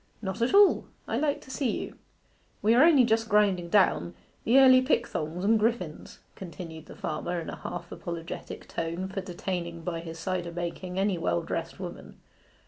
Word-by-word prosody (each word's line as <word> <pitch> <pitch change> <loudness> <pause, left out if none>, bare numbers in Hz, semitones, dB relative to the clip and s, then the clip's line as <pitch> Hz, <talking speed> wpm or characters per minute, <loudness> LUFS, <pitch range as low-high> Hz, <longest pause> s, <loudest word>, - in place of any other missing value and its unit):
'Not 190 +1 -4
at 240 +11 +2
all. 405 -1 +6 0.2
I - - -2
like 290 -1 0
to 265 - -12
see 265 -1 -1
you.' - - -7 0.7
'We 220 +2 +5
are 250 +4 +6
only 300 -6 +6
just 225 -1 +1
grinding 200 -5 +3
down 185 -2 +3 0.3
the 240 +4 +5
early 260 -1 +8
pickthongs 180 - -1
and 220 +2 +4
griffins,' 210 -8 -2 0.2
continued 165 -3 -9
the - - -11
farmer, 170 +3 -3
in 165 - -6
a - - -7
half 175 0 -7
apologetic 170 -1 -7
tone 170 +3 -3
for 195 0 -4
detaining 175 -2 -4
by 170 -1 -3
his 165 -1 -8
cider 175 0 -3
making 175 +2 -5
any 195 -2 +1
well 85 - 0
dressed - - -4
woman. - - -8
185 Hz, 175 wpm, -28 LUFS, 170-225 Hz, 0.7 s, early